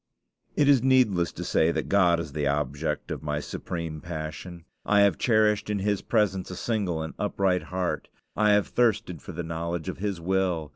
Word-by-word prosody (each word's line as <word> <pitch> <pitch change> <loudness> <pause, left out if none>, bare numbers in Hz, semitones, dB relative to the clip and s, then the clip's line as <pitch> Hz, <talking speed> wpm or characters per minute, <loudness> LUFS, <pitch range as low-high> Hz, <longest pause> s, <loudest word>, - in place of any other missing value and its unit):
It 145 - +3
is 140 -4 +6
needless 120 -9 +3
to - - -6
say 80 +1 +2
that - - -2
God 90 -4 +4
is 80 -3 -5
the 75 -2 -1
object 75 +2 -2
of - - -4
my 75 -1 -2
supreme 80 0 -5
passion. 85 +1 -7 0.2
I 105 -1 +4
have 100 -5 +3
cherished 110 -3 +2
in 105 - 0
his 100 0 0
presence 100 -5 0
a 90 - -6
single 95 -7 -1
and 80 - -6
upright 95 -3 +1
heart. 90 -1 -3 0.3
I 105 0 +4
have 105 -1 +3
thirsted 105 - 0
for - - -9
the 85 +2 -4
knowledge 85 +1 -3
of 95 - -6
his 100 -3 -2
will. 90 -3 0
90 Hz, 190 wpm, -26 LUFS, 80-105 Hz, 0.3 s, is